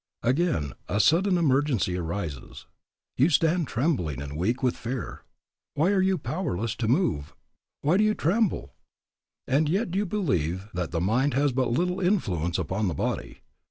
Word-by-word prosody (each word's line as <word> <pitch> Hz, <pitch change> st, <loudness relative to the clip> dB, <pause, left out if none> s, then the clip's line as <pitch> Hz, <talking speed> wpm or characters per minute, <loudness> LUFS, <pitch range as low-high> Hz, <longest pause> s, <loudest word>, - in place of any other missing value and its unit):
Again, 125 Hz, -, +1 dB, 0.2 s
a 100 Hz, -, 0 dB
sudden 175 Hz, -, +4 dB
emergency 135 Hz, -, +1 dB
arises. 85 Hz, -5 st, -5 dB, 0.5 s
You 135 Hz, +6 st, +4 dB
stand 165 Hz, +2 st, +2 dB
trembling 115 Hz, -, -1 dB
and 70 Hz, 0 st, -6 dB
weak 110 Hz, -, -1 dB
with 125 Hz, -, +2 dB
fear. 120 Hz, 0 st, -5 dB, 0.5 s
Why 165 Hz, +7 st, +3 dB
are 195 Hz, -2 st, +3 dB
you 190 Hz, 0 st, +2 dB
powerless 115 Hz, -, -3 dB
to 115 Hz, -, -1 dB
move? 110 Hz, -, 0 dB, 0.5 s
Why 155 Hz, +6 st, +3 dB
do 210 Hz, -, +4 dB
you 215 Hz, 0 st, +2 dB
tremble? 200 Hz, +5 st, 0 dB, 0.7 s
And 145 Hz, +3 st, +2 dB
yet 190 Hz, +2 st, 0 dB
you 200 Hz, +2 st, 0 dB
believe 95 Hz, -, -1 dB
that 90 Hz, -2 st, -2 dB
the 85 Hz, -1 st, -2 dB
mind 120 Hz, +8 st, +1 dB
has 145 Hz, +1 st, +2 dB
but 130 Hz, 0 st, 0 dB
little 180 Hz, +9 st, 0 dB
influence 95 Hz, -, 0 dB
upon 100 Hz, +2 st, -1 dB
the 85 Hz, -, -2 dB
body. -, -, -3 dB
130 Hz, 160 wpm, -26 LUFS, -, 0.7 s, sudden